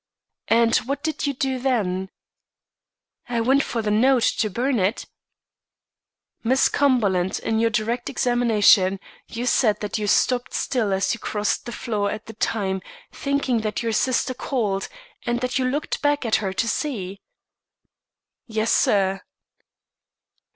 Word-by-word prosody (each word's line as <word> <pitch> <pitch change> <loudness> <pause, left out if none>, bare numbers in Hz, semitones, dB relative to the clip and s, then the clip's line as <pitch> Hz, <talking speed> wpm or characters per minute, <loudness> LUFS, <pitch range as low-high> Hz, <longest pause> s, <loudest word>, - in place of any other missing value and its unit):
"And 230 0 +4
what 280 +3 -3
did 315 -2 -2
you 280 - 0
do 265 0 -1
then?" 195 -8 -1 1.2
"I 240 -1 0
went 265 +5 +3
for 230 -5 -3
the 210 - 0
note, 245 +3 +3 0.2
to 215 - +1
burn 245 +4 0
it." 195 +5 0 1.4
"Miss 260 +3 +3
Cumberland, 205 -10 +1
in 220 0 0
your 230 0 +3
direct 235 +2 -1
examination, 220 -7 +3 0.3
you 235 +2 -5
said 225 -4 +2
that 210 +1 -3
you 210 - -2
stopped 245 +4 +1
still 230 -6 0
as 195 0 +1
you 235 - -6
crossed 210 +2 -2
the - - -4
floor 210 -4 -2
at 215 +1 -6
the 225 - -9
time, 195 -3 -1 0.3
thinking 280 -4 -1
that 215 +1 -3
your 230 - 0
sister 255 +3 +1
called, 215 -7 -2 0.4
and 240 0 0
that 250 +1 -1
you 255 - 0
looked 285 +4 -2
back 290 -2 +1
at 225 - +3
her 195 -3 -2
to 230 +4 -1
see." 200 -9 -3 1.3
"Yes, 220 -1 -1
sir." 195 -1 +2
230 Hz, 145 wpm, -23 LUFS, 205-255 Hz, 1.4 s, And